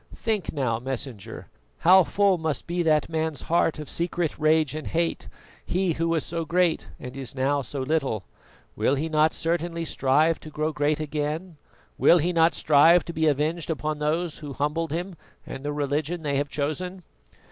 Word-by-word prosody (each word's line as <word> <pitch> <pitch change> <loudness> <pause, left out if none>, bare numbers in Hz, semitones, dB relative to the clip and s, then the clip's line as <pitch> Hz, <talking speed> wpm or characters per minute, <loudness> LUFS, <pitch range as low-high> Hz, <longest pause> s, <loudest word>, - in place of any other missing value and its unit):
Think 220 -5 -2
now, 125 -6 -1
Messenger, 125 -4 -6 0.4
how 185 +2 +7
full 195 +1 +2
must 160 -4 -1
be 175 +1 -1
that 155 -3 +2
man's 160 -3 -2
heart 165 -1 +1
of 150 -1 -7
secret 170 -1 -1
rage 155 -1 +3
and 155 0 -5
hatred, 165 0 -2 0.3
he 185 0 0
who 165 +1 -1
was 165 -2 0
so 165 0 -3
great 170 +1 +1
and 125 +1 -8
is 135 -1 -6
now 140 +2 +1
so 135 +2 -5
little! 135 -7 -1 0.5
Will 140 - +2
he 155 +4 -2
not 155 0 +3
certainly 170 0 -2
strive 150 +3 +2
to 155 - -10
grow 155 +1 -2
great 150 +1 0
again? 155 +3 -3 0.4
Will 175 - +6
he 175 +2 0
not 165 0 +4
strive 160 +4 +5
to 170 - -6
be 160 0 +1
avenged 155 +4 0
upon 155 -1 -2
those 155 +2 -1
who 145 -3 -7
humbled 150 +3 -1
him 175 +3 -3 0.3
and 135 - -8
the 145 - -2
religion 150 +3 -2
they 145 -2 -1
have 145 +1 -1
chosen?" 180 +6 -3
155 Hz, 180 wpm, -25 LUFS, 145-170 Hz, 0.5 s, how